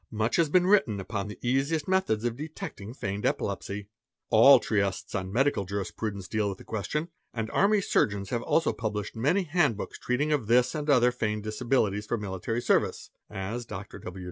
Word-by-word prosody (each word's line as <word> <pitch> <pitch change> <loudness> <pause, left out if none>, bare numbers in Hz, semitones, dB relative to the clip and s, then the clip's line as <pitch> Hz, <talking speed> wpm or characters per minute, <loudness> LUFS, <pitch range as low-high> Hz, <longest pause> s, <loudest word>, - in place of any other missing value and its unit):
Much 110 +1 0
has 165 -3 +3
been 180 +3 +4
written 185 - +3
upon 100 +1 -4
the 105 - -8
sasiest 140 +5 0
methods 185 - +1
of 120 -1 0
detecting 135 -8 -7
feigned 100 -5 -4
epilepsy; 100 +1 -2 0.4
all 130 +4 +8
treatises 100 -4 -1
on 95 0 -3
Medical 125 -4 +1
7 100 0 -2
RB - - -9
rispradence 100 -4 -4
deal 105 0 0
with 95 - -5
the - - -13
question; 150 - -3 0.3
and 110 -1 -3
army 205 +1 +3
surgeons 100 - 0
have 120 -2 0
also 160 +5 +1
_ - - -15
published 105 -2 -3
many 150 - +2
handbooks 150 - 0
treating 140 +5 0
of 145 -8 0
this 125 +2 +4
and 150 -1 -3
other 125 -3 +5
feigned 105 -3 -2
disabilities 110 -2 0
'or 120 - +2
military 105 +3 -3
service - - +1 0.2
(as 100 +6 -4
Dr. 95 +2 -8
W. 90 +1 -8
115 Hz, 190 wpm, -28 LUFS, 100-140 Hz, 0.4 s, all